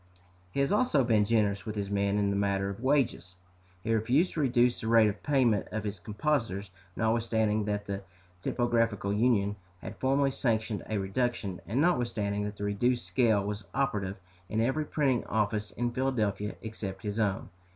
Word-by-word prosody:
He 140 - -1
has 140 - +1
also 205 - +3
been 110 -3 +3
generous 105 -3 +1
with 110 -1 -5
his 100 -1 -3
men 100 0 +1
in 100 -1 +2
the - - 0
matter 100 0 0
of 100 - -8
wages. 125 - +1 0.5
"He 115 - 0
refused 125 - +2
to - - -3
reduce 125 -3 +2
the 110 - -4
rate 115 -1 +6
of 105 0 -3
payment 130 -8 +2
of 110 0 -3
his 100 -2 -4
compositors, 105 - -1 0.2
notwithstanding 110 -2 +1
that 105 -1 -2
the 100 -1 -4 0.4
Typographical 115 -3 0
Union 105 -2 +2 0.2
had - - -8
formerly 135 +1 +2
sanctioned 110 -5 -1
a 110 - 0
reduction, 100 -1 -2
and 115 +6 0
notwithstanding 115 -10 +1
that 105 0 -5
the - - -5
reduced 115 +3 0
scale 100 +2 +2
was 105 +1 -4
operative 105 -8 -1 0.3
in 110 - -1
every 135 +7 +1
printing 135 -6 +1
office 105 -1 -1
in 120 0 -2
Philadelphia 110 -6 -1
except 100 -4 -6
his 105 +1 -3
own. 100 -3 0
110 Hz, 170 wpm, -29 LUFS, 100-120 Hz, 0.5 s, rate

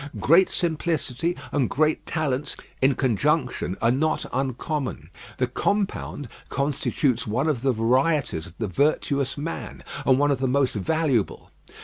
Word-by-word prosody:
Great 175 +5 +5
simplicity 165 -2 -1
and 140 -4 +1
great 155 +2 +1
talents 150 -3 -1 0.3
in 135 0 +4
conjunction 130 - 0
are 115 - +5
not 155 +5 +1
uncommon. 130 - -3 0.3
The 125 - +2
compound 190 0 -1 0.2
constitutes 140 -2 0
one 125 +8 0
of 145 -7 0
the 135 0 +2
varieties 125 - +1
of 85 - -15
the 115 - -2
virtuous 140 - +1
man, 155 +3 -5 0.2
and 130 - +4
one 145 +1 +3
of 135 - 0
the 130 - +1
most 135 0 +2
valuable. 135 - 0
140 Hz, 135 wpm, -25 LUFS, 125-155 Hz, 0.3 s, Great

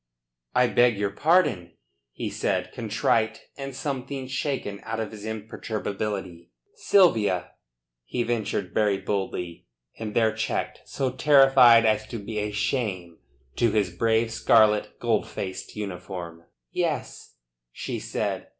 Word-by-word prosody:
"I 125 - +5
beg 120 -2 +3
your 100 -1 -1
pardon," 100 - +2 0.4
he - - -5
said, - - -1
contrite, 110 -1 0
and 135 -2 -6
something 135 -1 -4
shaken 130 -6 -3
out 110 0 -4
of 110 - -3
his 105 -1 -9
imperturbability. 105 -4 -4 0.2
"Sylvia," 115 - +3 0.5
he 120 - -2
ventured 110 -6 -2
very 105 -2 +2
boldly, 95 -3 -4 0.3
and 110 -2 -5
there 110 -2 +3
checked, 110 0 -3
so 130 -2 -1
terrified 130 -4 +6
as 110 0 +2
to 115 - -5
be 105 +1 -5
a 105 0 -1
shame 105 -6 -2 0.4
to 120 - +3
his 105 -3 +1
brave 115 +3 +2
scarlet, 110 -2 +3
gold 115 -3 +1
laced 95 -1 -5
uniform. 90 -4 -6 0.3
"Yes?" - - -3 0.4
she - - -5
said. - - -3
110 Hz, 125 wpm, -25 LUFS, 100-120 Hz, 0.5 s, terrified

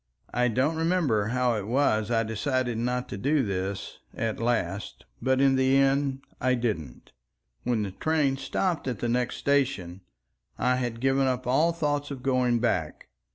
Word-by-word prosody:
I 125 0 +2
don't 130 +7 +1
remember 160 - +1
how 125 0 +1
it 100 -1 -4
was 115 -4 +2
I 115 -1 +2
decided 120 +2 -1
not 125 +1 -1
to 100 - -5
do 140 +4 +2
this, 95 0 -4 0.2
at 115 -1 -2
last, 110 -5 -2 0.2
but 130 +2 +2
in 135 -1 +4
the 130 +1 +4
end 135 0 +2 0.2
I 130 0 +3
didn't. 105 - -4 0.5
When 115 -4 +1
the 100 - -4
train 145 +4 +1
stopped 170 +1 -1
at 125 -4 -2
the 120 - -2
next 125 +1 0
station 130 -11 0 0.6
I 125 0 +2
had 120 -2 -3
given 135 0 +2
up 130 -1 -1
all 150 +7 +3
thoughts 145 -3 -1
of 135 -3 -7
going 125 -2 +2
back. 90 -10 -1
125 Hz, 165 wpm, -27 LUFS, 115-135 Hz, 0.6 s, in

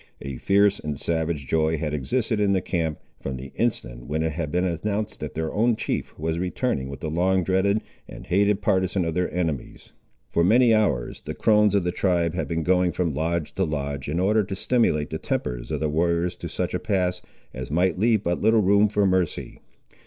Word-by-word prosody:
A 70 -2 -5
fierce 100 +4 +3
and 75 -2 -4
savage 80 -3 -1
joy 80 +2 +1
had 75 -1 -3
existed 105 - -1
in 100 -1 +3
the 95 - +3
camp, 80 -4 -2 0.2
from 65 -1 -4
the 65 +1 -9
instant - - -2
when 80 +2 -1
it 80 - 0
had 75 -1 -4
been 90 +1 +1
announced 105 +5 -2
that 75 -3 -6
their 80 0 -2
own 115 +2 +2
chief - - -3
was 80 +2 -2
returning 90 - -1
with 70 -1 -8
the 80 - -3
long 90 +3 +2
dreaded 100 +3 +2 0.3
and - - -10
hated 100 +2 +2
partisan 95 -3 +1
of 80 - -1
their 90 +2 -1
enemies. 80 -7 -4 0.4
For 85 - +2
many 115 +5 +5
hours 95 - 0
the - - -5
crones 105 -2 +4
of 100 - +2
the 90 - 0
tribe 85 -3 +1
had 90 - -2
been 85 -1 -2
going 90 +1 +2
from 85 -4 -1
lodge 80 +2 -2
to 95 - 0
lodge, 70 -4 -3
in 80 +4 -1
order 105 +3 +3
to 95 0 -5
stimulate 95 -9 +1
the 80 - -3
tempers - - -3
of - - -2
the 80 - 0
warriors 85 +3 0
to - - -6
such - - -3
a - - 0
pass, 90 -2 0 0.3
as 65 -1 -6
might 90 +4 +1
leave 110 -1 +3
but 85 +1 -1
little 110 0 +4
room 100 +2 +4
for 105 -1 +2
mercy. 95 -3 -1
90 Hz, 210 wpm, -24 LUFS, 80-100 Hz, 0.4 s, many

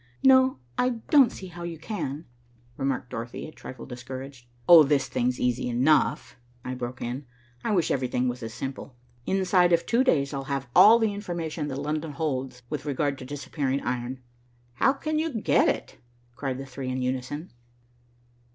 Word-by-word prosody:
"No, 260 0 +6 0.2
I 250 -1 +2 0.2
don't 275 -6 +7
see 190 - -9
how 175 0 -10
you 170 -1 -5
can," 155 -4 -4 0.5
remarked 135 -2 -2
Dorothy, 115 +1 -5
a - - -10
trifle 130 -5 -10
discouraged. 130 +1 -8 0.2
"Oh, 170 -2 +10
this 140 -2 +2
thing's 125 +1 -1
easy 125 0 0
enough," 130 +6 +2 0.3
I 130 - -3
broke 125 0 -5
in. 125 +3 -5 0.4
"I - - 0
wish 175 -5 +2
everything 125 -1 0
was 125 +1 -3
as 115 -1 -5
simple. 135 +2 -6 0.3
Inside 185 -2 +3
of 170 - +3
two 240 +2 +3
days, 145 - +2
I'll 135 -1 -4
have 135 -2 -3
all 225 +2 +9
the 220 -3 +1
information 170 -6 -4
that 135 - -4
London 150 +2 -3
holds 130 -4 -3
with 145 +1 -5
regard 140 0 -1
to 130 - -8
disappearing 140 0 -2
iron." 125 +1 -3 0.5
"How 125 - +3
can 310 +2 -2
you 310 -7 -1
get - - +3
it?" - - -4 0.4
cried 135 -2 -3
the 135 - -6
three 135 0 -6
in 130 0 -2
unison. 130 +6 -3
140 Hz, 170 wpm, -26 LUFS, 125-170 Hz, 0.5 s, Oh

